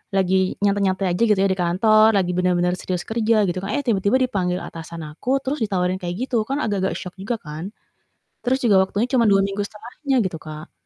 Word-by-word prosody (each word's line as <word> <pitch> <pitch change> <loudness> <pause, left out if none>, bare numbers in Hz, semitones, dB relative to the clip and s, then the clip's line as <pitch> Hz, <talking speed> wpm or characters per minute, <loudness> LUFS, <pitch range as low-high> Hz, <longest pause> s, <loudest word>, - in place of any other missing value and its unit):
lagi 190 0 +1
nyantai-nyantai 195 -1 +1
aja 180 - -4
gitu 210 -2 +3
ya 195 - +4
di 190 - +1
kantor, 215 +5 +4
lagi 180 -2 0
bener-bener 180 -1 +2
serius 180 -2 -3
kerja 220 -1 +2
gitu 175 - -2
kan, 195 - -4
eh, - - 0
tiba-tiba 205 +1 +2
dipanggil 185 -7 0
atasan 165 0 -8
aku, 255 - -1
terus 280 +3 -2
ditawarin 185 -3 0
kayak 175 -1 -3
gitu. 235 -4 +1
Kan 275 +2 -1
agak-agak 195 -3 -1
syok 180 -2 -8
juga 230 +4 -2
kan. 155 +7 -7 0.7
Terus 260 +2 +2
juga 200 -5 +5
waktunya 205 +5 -1
cuma 255 -3 +3
2 195 -1 +5
minggu 200 +1 -2
setelahnya 245 +6 -4
gitu, 180 -3 -3
Kak. 155 +1 -11
195 Hz, 200 wpm, -22 LUFS, 180-220 Hz, 0.7 s, juga